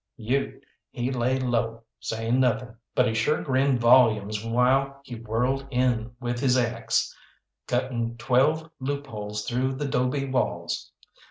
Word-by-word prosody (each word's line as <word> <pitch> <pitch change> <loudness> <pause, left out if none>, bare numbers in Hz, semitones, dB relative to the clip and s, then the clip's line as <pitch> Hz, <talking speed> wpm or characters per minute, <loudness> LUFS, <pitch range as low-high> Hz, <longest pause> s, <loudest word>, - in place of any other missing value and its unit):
Ute, 130 +4 -2 0.3
he 120 +2 -3
lay 130 +1 +1
low, 115 -3 -1 0.2
saying 115 +3 -1
nothing, 120 -1 +1 0.2
but 125 - +4
he 115 - 0
sure 115 +7 +1
grinned 135 -1 +2
volumes 110 -4 +4
while 130 +4 +2
he 130 - -10
whirled 120 +4 -1
in 125 -2 0
with 120 -1 -3
his 130 -1 +3
axe, 120 -2 0 0.5
cutting 120 -2 -1
twelve 150 +7 +2
loopholes 110 -7 -4
through 130 +2 0
the 145 +2 -3
'dobe 130 +1 0
walls. 130 - -1
125 Hz, 135 wpm, -26 LUFS, 115-130 Hz, 0.5 s, but